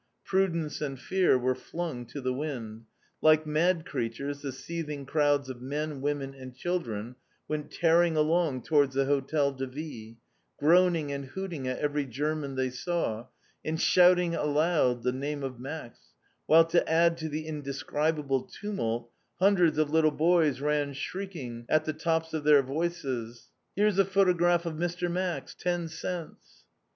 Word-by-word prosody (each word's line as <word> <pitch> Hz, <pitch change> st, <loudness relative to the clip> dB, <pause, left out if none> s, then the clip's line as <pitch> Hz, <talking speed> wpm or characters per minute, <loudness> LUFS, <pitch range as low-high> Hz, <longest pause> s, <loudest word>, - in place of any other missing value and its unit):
Prudence 170 Hz, -6 st, 0 dB
and 135 Hz, -3 st, -3 dB
fear 185 Hz, -3 st, +3 dB
were 130 Hz, +1 st, +1 dB
flung 155 Hz, -4 st, -5 dB
to 140 Hz, -, -7 dB
the 130 Hz, 0 st, -1 dB
wind. 120 Hz, -6 st, -5 dB, 0.4 s
Like 155 Hz, 0 st, +5 dB
mad 165 Hz, +2 st, +1 dB
creatures 140 Hz, +5 st, -4 dB
the 140 Hz, -, -4 dB
seething 150 Hz, +1 st, -5 dB
crowds 145 Hz, -1 st, +2 dB
of 130 Hz, -2 st, -7 dB
men, 145 Hz, +2 st, -3 dB
women, 140 Hz, -1 st, -2 dB
and 130 Hz, -2 st, -11 dB
children 125 Hz, -8 st, -3 dB, 0.3 s
went 150 Hz, -1 st, -3 dB
tearing 170 Hz, -1 st, +3 dB
along 155 Hz, -4 st, +1 dB
towards 145 Hz, -4 st, +2 dB
the 135 Hz, 0 st, +2 dB
Hotel 140 Hz, +1 st, +1 dB
de 135 Hz, -1 st, -5 dB
Ville, 130 Hz, -5 st, -8 dB, 0.4 s
groaning 165 Hz, -1 st, +3 dB
and 140 Hz, 0 st, -4 dB
hooting 165 Hz, -2 st, -5 dB
at 130 Hz, -, -2 dB
every 145 Hz, -1 st, -1 dB
German 145 Hz, +2 st, -2 dB
they 130 Hz, -1 st, 0 dB
saw, 125 Hz, -5 st, -2 dB, 0.4 s
and 160 Hz, +1 st, -2 dB
shouting 180 Hz, -1 st, +5 dB
aloud 150 Hz, -5 st, +1 dB
the 125 Hz, -, +2 dB
name 140 Hz, +2 st, -4 dB
of 130 Hz, -3 st, -5 dB
"Max," 135 Hz, -1 st, -7 dB, 0.5 s
while 165 Hz, +1 st, +7 dB
to 165 Hz, 0 st, +1 dB
add 170 Hz, +1 st, +4 dB
to 160 Hz, -1 st, -4 dB
the 155 Hz, +1 st, -4 dB
indescribable 145 Hz, -1 st, -1 dB
tumult, 120 Hz, -, -4 dB, 0.3 s
hundreds 180 Hz, -4 st, +4 dB
of 155 Hz, -1 st, +1 dB
little 160 Hz, 0 st, +4 dB
boys 155 Hz, -3 st, +2 dB
ran 145 Hz, -1 st, 0 dB
shrieking 145 Hz, -7 st, -6 dB
at 155 Hz, 0 st, +3 dB
the 155 Hz, -, -1 dB
tops 160 Hz, +1 st, -1 dB
of 155 Hz, -2 st, -2 dB
their 145 Hz, -2 st, +6 dB
voices, 135 Hz, -6 st, -3 dB, 0.3 s
"_Voici 210 Hz, -1 st, +3 dB
le 195 Hz, -, +6 dB
photographie 175 Hz, -3 st, +3 dB
ed 160 Hz, -2 st, -4 dB
Monsieur 175 Hz, +1 st, -1 dB
Max, 175 Hz, -5 st, -2 dB
dix 175 Hz, -2 st, -2 dB
centimes! 175 Hz, -3 st, -7 dB
150 Hz, 155 wpm, -29 LUFS, 135-170 Hz, 0.5 s, while